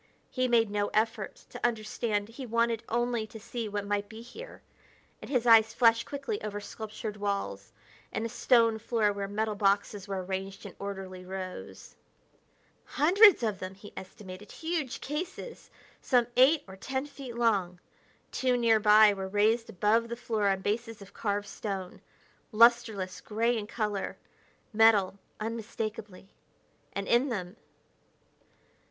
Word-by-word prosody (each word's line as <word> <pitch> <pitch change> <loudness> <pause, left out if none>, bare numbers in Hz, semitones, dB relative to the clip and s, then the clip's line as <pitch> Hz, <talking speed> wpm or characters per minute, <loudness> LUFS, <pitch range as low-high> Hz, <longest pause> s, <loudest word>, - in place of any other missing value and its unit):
He 255 -1 0
made 230 -3 +3
no 205 0 0
effort 220 -2 -1
to - - -9
understand; 215 -2 -1
he 255 +3 -8
wanted 230 0 +1
only 235 -1 0
to 220 0 -10
see 235 0 -5
what 205 0 -3
might 205 0 -2
be 225 +1 -10
here; 455 - -11 0.6
and - - -9
his 250 -4 +1
eyes 225 -1 +6
flashed 230 -1 +4
quickly 290 +10 -4
over 205 -1 -4
sculptured 215 0 -7
walls 115 - -3 0.4
and 220 - -2
a - - -3
stone 230 -1 +3
floor 215 -2 +1
where 200 0 -4
metal 215 +2 -1
boxes 200 0 0
were 190 -2 -3
arranged 190 +1 -5
in - - -9
orderly 190 -2 -6
rows. 185 0 -8 0.9
Hundreds 370 - +5
of 215 -4 -1
them, 185 +1 -6
he 205 +1 -13
estimated; 190 +1 -10
huge 320 -6 -3
cases, 355 - -6 0.3
some 245 -3 +3
eight 270 +5 +5
or 190 - -10
ten 265 +7 -3
feet 275 -4 -9
long. 200 -7 +1 0.5
Two 255 -1 +1
nearby 215 -2 +6
were 190 -1 -5
raised 215 +4 +2
above 225 +3 +1
the 235 - -3
floor 225 -3 -1
on 195 -1 +1
bases 225 +1 -3
of 200 - -16
carved 205 -1 -2
stone. 195 -3 -5 0.5
Lusterless 225 -4 +3
gray 230 +3 0
in 210 -2 -4
color 210 -3 -3 0.6
metal, 210 -3 +4 0.2
unmistakably 215 -3 -5 0.6
and 200 0 -4
in 245 +4 +3
them.... 190 -5 -4
220 Hz, 145 wpm, -29 LUFS, 200-235 Hz, 0.9 s, eyes